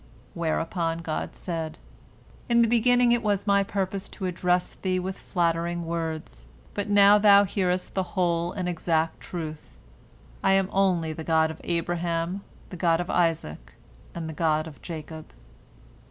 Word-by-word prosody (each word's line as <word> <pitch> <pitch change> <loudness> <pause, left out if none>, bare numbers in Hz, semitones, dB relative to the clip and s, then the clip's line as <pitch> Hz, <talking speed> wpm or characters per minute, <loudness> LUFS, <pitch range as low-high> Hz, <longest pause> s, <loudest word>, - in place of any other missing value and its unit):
Whereupon 165 0 -1
God 155 -1 -3
said, 165 -3 -4 0.7
"In 235 0 +5
the - - +3
beginning 240 +1 +4
it 240 0 +3
was 205 -3 0
My 200 -1 +4
purpose 195 0 -3
to 190 - -6
address 180 0 0
thee 185 -1 -1
with 185 +1 -3
flattering 170 -2 -1
words, 160 - -4 0.3
but 205 0 -3
now 205 0 +7
thou 205 -1 +7
hearest 185 -2 -1
the 190 - +1 0.2
whole 170 -1 +1
and 185 -2 -3
exact 165 -2 0
truth, 155 -3 -7 0.7
I 195 - +4
am 195 0 +2
only 180 -5 +1
the 160 - -7
God 160 0 +2
of 160 - -11
Abraham, 170 +2 -1 0.3
the 180 - -7
God 165 -2 +2
of 175 - -3
Isaac, 165 - -1 0.4
and 165 -2 -4
the 160 - -5
God 155 0 +1
of 160 -3 -11
Jacob." 160 -1 -8
175 Hz, 155 wpm, -26 LUFS, 165-195 Hz, 0.7 s, now